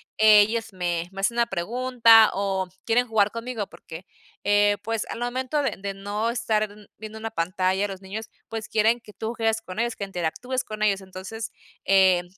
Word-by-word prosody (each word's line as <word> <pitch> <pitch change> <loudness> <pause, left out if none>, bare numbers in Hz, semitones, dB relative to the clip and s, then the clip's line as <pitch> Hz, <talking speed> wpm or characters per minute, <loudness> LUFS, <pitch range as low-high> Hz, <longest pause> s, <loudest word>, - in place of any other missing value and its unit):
ellos 220 +1 +5
me 175 -2 -2
me 195 - -9
hacen 200 +4 0
una 235 0 +2
pregunta 230 +3 +5
o 190 -1 -1 0.2
quieren 245 +2 +2
jugar 210 -2 +3
conmigo 230 -3 -4
porque, 165 +3 -11 0.4
eh, 205 0 +4
pues, 225 -1 -1
al - - -5
momento 255 +4 -1
de 270 -4 0
de 195 0 -4
no 205 +3 -2
estar 225 -3 0 0.3
viendo 215 0 -8
una 225 0 -5
pantalla, 185 +1 0
los 190 -1 -7
niños, 205 +3 -7 0.2
pues, 225 -1 -6
quieren 225 +2 +2
que 215 - -14
tú 220 +2 -5
juegues 225 -1 0
con 185 +3 -7
ellos, 235 0 -1
que 200 - -3
interactúes 195 +8 -3
con 215 0 -8
ellos, 200 -2 +2
entonces, 190 +4 -7 0.3
eh, 190 -2 +4
215 Hz, 180 wpm, -25 LUFS, 195-230 Hz, 0.4 s, ellos